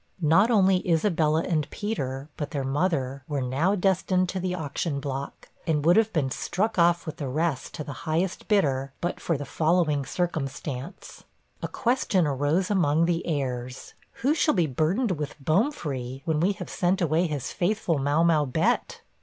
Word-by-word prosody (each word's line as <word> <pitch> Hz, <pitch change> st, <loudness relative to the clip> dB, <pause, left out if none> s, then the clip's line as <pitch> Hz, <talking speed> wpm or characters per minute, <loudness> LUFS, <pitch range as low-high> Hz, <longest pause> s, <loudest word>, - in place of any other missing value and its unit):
Not 165 Hz, +9 st, +5 dB
only 195 Hz, -5 st, +4 dB
Isabella 160 Hz, -2 st, +2 dB
and 155 Hz, -5 st, -1 dB
Peter, 135 Hz, -11 st, -4 dB
but 145 Hz, -, -4 dB
their 140 Hz, -4 st, -3 dB
mother, 135 Hz, -2 st, -1 dB
were 145 Hz, -2 st, -2 dB
now 135 Hz, +10 st, +1 dB
destined 185 Hz, -1 st, +1 dB
to 190 Hz, -, -2 dB
the 180 Hz, 0 st, -2 dB
auction 150 Hz, -2 st, -3 dB
block, 140 Hz, -1 st, -6 dB, 0.2 s
and 150 Hz, -2 st, +1 dB
would 175 Hz, +2 st, +6 dB
have 225 Hz, 0 st, +3 dB
been 140 Hz, -5 st, 0 dB
struck 210 Hz, -, -1 dB
off 170 Hz, 0 st, +3 dB
with 155 Hz, -2 st, -6 dB
the 140 Hz, -, -4 dB
rest 150 Hz, +1 st, -2 dB
to 155 Hz, -, -4 dB
the 145 Hz, -, -7 dB, 0.2 s
highest 175 Hz, +4 st, -1 dB
bidder, 135 Hz, -10 st, +1 dB
but 175 Hz, -, -2 dB
for 165 Hz, -, -1 dB
the 145 Hz, -, -5 dB
following 155 Hz, -1 st, +1 dB
circumstance: 150 Hz, -1 st, -4 dB, 0.4 s
A -, -, -2 dB
question 230 Hz, -7 st, +1 dB
arose 145 Hz, +7 st, 0 dB
among 165 Hz, -4 st, +3 dB
the 170 Hz, 0 st, 0 dB
heirs, 130 Hz, -5 st, -3 dB, 0.3 s
'Who 280 Hz, +4 st, +4 dB
shall 310 Hz, -3 st, +2 dB
be 175 Hz, -4 st, +3 dB
burdened 165 Hz, -, 0 dB
with 150 Hz, -2 st, -4 dB
Bomefree, 145 Hz, -, -1 dB
when 160 Hz, -2 st, +1 dB
we 185 Hz, +5 st, +2 dB
have -, -, -7 dB
sent 180 Hz, +1 st, +1 dB
away 170 Hz, +1 st, +2 dB
his 145 Hz, -5 st, -4 dB
faithful 175 Hz, -4 st, 0 dB
Mau 145 Hz, +4 st, +2 dB
mau 165 Hz, -3 st, +4 dB
Bett?' 130 Hz, -3 st, 0 dB
160 Hz, 170 wpm, -26 LUFS, 140-185 Hz, 0.4 s, would